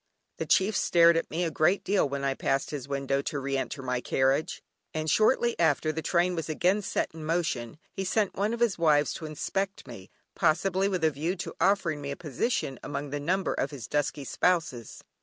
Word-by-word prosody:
The - - -4
chief 200 +3 +3
stared 170 -2 +5
at 165 - -1
me 170 +3 -1
a 165 - -1
great 155 +6 +2
deal 195 -7 +1
when 140 0 -3
I 135 -1 +1
passed 135 +1 -1
his 140 -3 -5
window 140 0 -1
to 145 - -3
re 135 0 -2
enter 135 +1 -3
my 125 -1 -1
carriage, 135 +5 0 0.3
and 155 0 -2
shortly 235 - +3
after 155 -1 +2
the 160 +1 -4
train 175 +3 +1
was 165 -2 -4
again 180 +6 +2
set 195 - -2
in 160 -1 -8
motion 155 -7 -1
he 195 - -4
sent 200 +1 0
one 205 +3 0
of 235 0 -4
his 230 -7 +2
wives 150 -3 +3
to 160 - -6
inspect 195 +6 -3
me, 100 -6 -11 0.2
possibly 185 +4 +2
with 185 -4 -2
a 160 - +4
view 160 +6 -2
to 175 - -6
offering 175 -7 +2
me 140 - -5
a 140 - -3
position 145 - -2
among 145 -1 -5
the 145 - -2
number 185 +6 0
of - - -1
his 140 -5 -8
dusky 145 -1 -1
spouses. 155 - -1
155 Hz, 210 wpm, -28 LUFS, 140-185 Hz, 0.3 s, stared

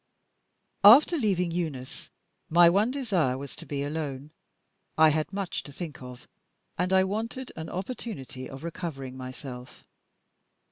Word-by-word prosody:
After 265 - +9
leaving 190 - +1
Eunice, 155 -7 -4 0.4
my 170 +1 +7
one 205 +6 +3
desire 195 - 0
was 140 0 -7
to - - -10
be 140 -1 -2
alone. 145 -1 -4 0.7
I 160 0 +7
had 155 +2 -1
much 195 -2 -3
to 145 - -11
think 150 -2 -7
of, 125 -1 -10 0.5
and 180 +1 -1
I 190 0 +5
wanted 225 +6 -3
an 160 0 -6
opportunity 185 - -6
of 135 +2 -9
recovering 140 -6 -5
myself. 130 -1 -9
165 Hz, 135 wpm, -28 LUFS, 135-195 Hz, 0.7 s, After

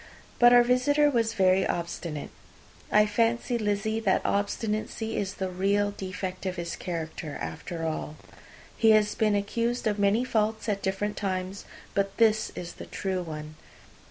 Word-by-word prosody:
But 240 0 +8
our 245 0 +8
visitor 285 +4 +3
was 230 -3 +1
very 190 -1 +4
obstinate. 170 -4 -4 0.6
I 210 0 +6
fancy, 230 +3 +1
Lizzy, 215 +1 0
that 200 -4 +1
obstinacy 215 +2 -1
is 195 -1 -2
the 190 - -2
real 200 +3 +1
defect 185 -1 -5
of 185 - -2
his 170 -2 -4
character, 160 -3 -5
after 165 - -5
all. 155 -1 -3 0.6
He 225 - +4
has 210 0 +1
been 215 -2 +2
accused 230 +5 -1
of 210 -1 0
many 205 +5 +3
faults 220 -2 0
at 200 -2 -1
different 205 +2 -2
times; 190 0 -3 0.3
but 200 0 -1
this 220 -1 +3
is 175 -1 -6
the - - -10
true 190 -2 -2
one. 155 -2 -7
205 Hz, 155 wpm, -27 LUFS, 185-220 Hz, 0.6 s, But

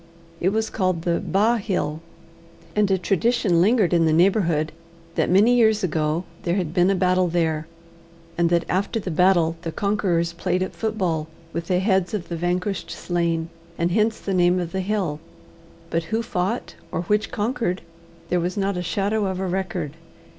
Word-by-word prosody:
It 180 - +2
was 220 +2 -1
called 185 -4 0
the 170 -1 0
Ba' 220 +5 +2
Hill, 170 -7 -2 0.7
and 210 -1 +3
a 190 - +3
tradition 195 -1 +2
lingered 205 -3 +3
in 165 -2 +4
the - - +3
neighbourhood 170 -3 +2 0.4
that - - 0
many 210 +7 +5
years 220 -3 +4
ago 155 0 0 0.2
there 175 0 0
had 175 -5 -2
been 180 +1 +4
a 195 - +3
battle 185 0 +2
there, 160 -2 0 0.7
and 170 -1 +2
that 170 -1 +2
after 200 +5 0
the 190 -3 -4
battle 170 -1 +3
the 165 - -4
conquerors 180 -4 0
played 180 +2 0
at 185 - -6
football 185 -8 -1 0.3
with 170 0 -4
the 180 - +2
heads 190 0 +1
of 175 -5 -5
the 170 - -3
vanquished 180 +3 -2
slain, 170 -2 -1 0.3
and 170 +1 0
hence 220 +3 +1
the 195 - -3
name 180 0 +3
of 175 -2 -3
the 190 - -1
hill; 185 -6 -1 0.7
but 165 0 0
who 225 +4 -1
fought 200 +1 -2 0.2
or 170 - -2
which 210 +4 +1
conquered, 220 -5 -1 0.5
there 180 - +2
was 175 +3 -2
not 195 -1 0
a - - -1
shadow 200 +4 0
of 190 -1 -3
a 190 - -1
record. 180 -5 -2
180 Hz, 180 wpm, -23 LUFS, 170-200 Hz, 0.7 s, many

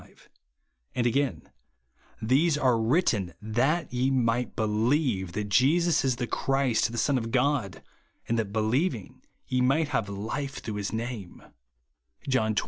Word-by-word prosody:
35); - - -21 0.7
and, 125 -2 0
again, 135 +2 -1 0.3
" 65 - -34
These 155 +2 +3
are 130 -3 +3
ivritten, 115 - +1
THAT 125 +9 0
YE 125 +2 +1
MIGHT 125 -2 0
BELIEVE 110 - 0
that 105 -1 -3
Jesus 155 - +3
is 130 -2 +1
the 125 0 -2
Christ, 135 -2 0
the 120 - -6
Son 135 +1 +2
of 115 -1 -5
God; 125 - 0 0.4
and 115 0 0
that 105 -3 -2
believing 110 - -1 0.2
ye 125 0 0
might 140 +5 +2
have 115 -7 -1
life 135 +8 -4
through 110 -2 -5
his 100 - -3
name," 110 -5 -5 0.8
(John 110 -5 +1
XX. - - +3
120 Hz, 150 wpm, -27 LUFS, 110-135 Hz, 0.8 s, These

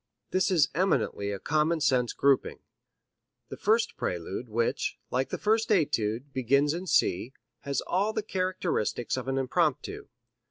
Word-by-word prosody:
This 185 0 +2
is 165 -6 +4
eminently 165 - 0
a 100 - -3
common 155 - +1
sense 125 -5 +2
grouping. 140 -1 +2 0.9
The - - -6
first 220 +2 +1
prelude, 90 +7 -4
which, 115 +2 -1
like 130 +1 0
the - - -3
first 220 +1 +1
etude, 135 - 0
begins 140 +3 +2
in 180 +3 -5
C, 115 - +1 0.3
has 140 -2 -2
all 200 +4 0
the 215 - -2
characteristics 185 - -1
of 130 0 -5
an 135 0 -1
impromptu. 150 +2 -1
140 Hz, 145 wpm, -28 LUFS, 125-185 Hz, 0.9 s, is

